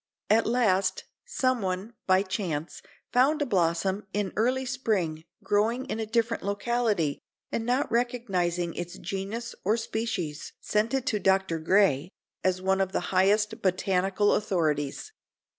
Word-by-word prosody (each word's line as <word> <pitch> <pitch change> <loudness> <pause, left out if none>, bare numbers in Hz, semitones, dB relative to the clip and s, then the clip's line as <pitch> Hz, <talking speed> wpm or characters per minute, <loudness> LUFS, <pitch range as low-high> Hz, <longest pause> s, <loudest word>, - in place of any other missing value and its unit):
At 225 +1 +4
last, 195 -6 +2 0.2
someone, 230 - -1
by 185 +1 +4
chance, 175 -6 -3 0.3
found 275 +5 +4
a - - -2
blossom, 190 -1 0
in 205 -2 -1
early 255 +4 +1
spring, 205 -12 -1 0.2
growing 215 +6 +1
in 225 - -4
a 220 - -2
different 230 +1 0
locality, 205 -6 0 0.3
and 230 0 -2
not 255 +3 +1
recognizing 190 -8 0
its 175 +2 -6
genus 195 +6 -4
or 215 +4 +2
species, 210 -10 -3
sent 215 +5 0
it 265 -1 -1
to 220 -7 0
Dr. 190 -3 +2
Gray, 165 -3 +3 0.3
as 185 0 +1
one 190 0 +2
of 190 0 -1
the - - -2
highest 210 +3 +3
botanical 190 +2 +2
authorities. 160 - -1
200 Hz, 135 wpm, -27 LUFS, 185-230 Hz, 0.3 s, At